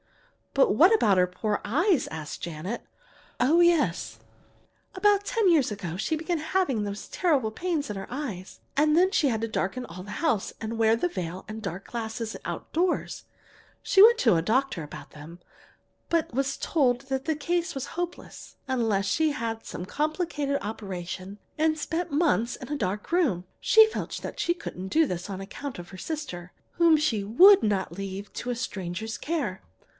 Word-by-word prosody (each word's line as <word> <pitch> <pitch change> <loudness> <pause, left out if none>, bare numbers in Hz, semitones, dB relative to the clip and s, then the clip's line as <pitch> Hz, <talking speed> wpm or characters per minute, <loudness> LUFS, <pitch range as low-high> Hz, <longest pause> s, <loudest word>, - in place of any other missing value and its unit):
"But 270 -7 +4
what 350 - +7
about 210 - +4
her 180 - +4
poor 205 +4 -2
eyes?" 320 - +2
asked 155 -2 -7
Janet. 175 +7 -5 0.6
"Oh, 300 +8 +4
yes! 345 -3 +2 0.8
About 405 +1 +3
ten 440 0 +1
years 300 -9 +3
ago 190 -5 -5
she 215 - -1
began 330 +2 -1
to - - -6
have 375 +3 +1
those 210 -6 -3
terrible 285 -11 +1
pains 315 +2 -2
in 210 - -4
her 195 0 -6
eyes, 245 -9 -6 0.2
and 300 +2 +3
then 370 +2 +4
she 295 -8 +3
had 225 -3 0
to 225 - -1
darken 220 +3 -2
all 180 -2 -9
the 205 - -9
house 270 -12 +1
and 225 +1 -4
wear 225 0 +4
the 235 - 0
veil 185 - -5
and 215 +1 -7
dark 195 -1 -6
glasses 225 -1 -4
outdoors. 350 +2 -2 0.6
She 385 - +5
went 460 +3 +9
to 185 - +5
a 165 - +2
doctor 225 - 0
about 150 - -10
them, 155 +4 -11 0.7
but 330 -6 0
was 275 +2 -1
told 255 -6 +1
that 270 -1 -3
the 315 - 0
case 340 +4 -1
was 270 0 -3
hopeless 350 0 -6
unless 225 -7 +1
she 310 +10 +2
had 230 -5 -4
some 180 - -6
complicated 295 - -1
operation 195 -2 -6 0.2
and 310 0 +2
spent 330 +2 -3
months 285 -6 +1
in - - -9
a 295 - -1
dark 205 - -3
room. 300 - +2 0.2
This - - -6
she 440 0 +8
felt 440 - -4 0.2
she 345 - +1
couldn't 190 - -7
do 320 +5 +3 0.2
on 190 -1 -5
account 250 +5 -7
of 175 - -9
her 190 - -10
sister, 185 - -5 0.2
whom 335 -2 +5
she 255 -10 0
would 365 - +7
not 200 -5 0
leave 195 +2 -6
to 245 - -5
a 245 - 0
stranger's 210 -2 -4
care. 285 - -3
245 Hz, 180 wpm, -27 LUFS, 195-320 Hz, 0.8 s, went